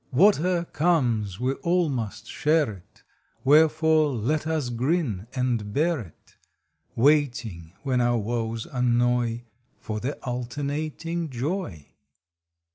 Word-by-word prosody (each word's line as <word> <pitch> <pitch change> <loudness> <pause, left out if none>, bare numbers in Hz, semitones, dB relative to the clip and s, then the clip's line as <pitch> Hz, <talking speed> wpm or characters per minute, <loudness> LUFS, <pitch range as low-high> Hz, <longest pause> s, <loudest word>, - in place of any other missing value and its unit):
Whate 180 +7 +5
er 175 +1 +1
comes 120 - +1
we 130 +2 0
all 175 0 +2
must 120 -7 -4
share 150 -4 +1
it; 95 -4 -15 0.4
Wherefore, 155 +1 +4
let 140 +6 -1
us 155 -6 -1
grin 120 - -1
and 120 -5 -1
bear 160 +2 +2
it, 95 -9 -13 0.6
Waiting, 120 - +1
when 130 -3 +1
our 120 0 +2
woes 115 0 -2
annoy, 120 -1 +1 0.3
For 110 -1 -5
the 135 +6 -3
alternating 145 +6 -3
joy. 135 - -4
130 Hz, 115 wpm, -25 LUFS, 115-155 Hz, 0.6 s, Whate